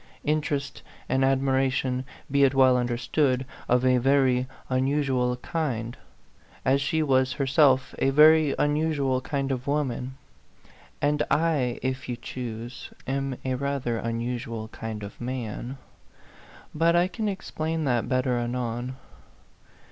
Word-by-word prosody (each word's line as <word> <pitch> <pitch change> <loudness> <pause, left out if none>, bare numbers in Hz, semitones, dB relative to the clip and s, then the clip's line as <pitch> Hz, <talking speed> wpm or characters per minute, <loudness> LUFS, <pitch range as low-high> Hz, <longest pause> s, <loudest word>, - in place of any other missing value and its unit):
Interest 145 -2 -1 0.3
and 130 +1 +1
admiration, 130 -1 +1 0.3
be 140 0 +4
it 135 0 +4
well 130 -1 +6
understood, 125 +2 0 0.2
of 125 +1 +3
a 125 -1 +4
very 130 -1 +3 0.2
unusual 130 -1 +1
kind, 125 -6 -3 0.7
as 135 +2 +3
she 155 +3 +1
was 130 -2 +2
herself 135 -1 +3
a 135 - +3
very 155 +1 +6
unusual 145 -3 +1
kind 140 0 -2
of 130 0 -3
woman; 130 -3 -2 0.9
and 145 +1 +2
I, 150 -7 +1
if 130 0 -3
you 125 - -1
choose, 120 -1 -7 0.2
am 135 -1 -2
a 130 - 0
rather 130 -3 -1
unusual 115 -1 -3
kind 110 -2 -6
of 100 +3 -9
man. 125 +1 -4 1.0
But 165 +2 +3
I 175 +1 +4
can 215 +2 -2
explain 160 -4 -3
that 125 -5 0
better 130 -1 +1
anon. 120 +1 -3
130 Hz, 125 wpm, -26 LUFS, 125-140 Hz, 1.0 s, well